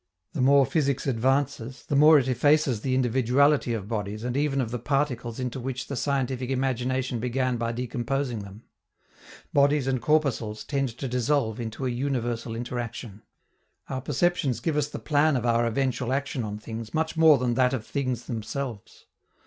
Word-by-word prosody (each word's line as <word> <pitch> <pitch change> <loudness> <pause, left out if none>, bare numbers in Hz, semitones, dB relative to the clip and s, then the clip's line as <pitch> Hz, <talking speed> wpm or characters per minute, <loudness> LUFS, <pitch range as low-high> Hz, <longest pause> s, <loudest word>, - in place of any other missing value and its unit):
The 145 - -2
more 140 +1 +6
physics 140 -4 0
advances, 135 0 0
the 145 - -1
more 150 +2 +8
it 135 -3 +1
effaces 130 -2 +2
the 130 +1 0
individuality 130 +2 +3
of 100 -3 -5
bodies 105 -1 -4
and 125 0 -2
even 140 -1 +1
of 120 -4 -1
the 125 - -3
particles 125 -3 -1
into 125 0 -3
which 130 0 -4
the 140 - -5
scientific 130 -1 -1
imagination 130 -1 -1
began 125 +1 0
by 115 0 -1
decomposing 125 +1 -2
them: 100 +2 -10 0.9
bodies 140 -1 +3
and 130 -2 0
corpuscles 135 -8 0
tend 135 -2 -1
to 135 - -4
dissolve 125 -2 0
into 115 +3 -4
a 125 - 0
universal 120 -3 -2
interaction. 120 -3 -5 0.7
Our 130 -1 -3
perceptions 145 -1 0
give 160 -3 -1
us 150 -1 0
the - - -6
plan 150 0 +2
of 120 - -3
our 120 0 +2
eventual 125 0 -1
action 135 -2 -1
on 105 -1 -4
things 110 +1 -7
much 160 +1 0
more 160 -2 +6
than 125 -1 0
that 125 +1 +3
of 125 -5 -3
things 130 -4 -2
themselves. 115 -1 -6
130 Hz, 170 wpm, -26 LUFS, 120-140 Hz, 0.9 s, more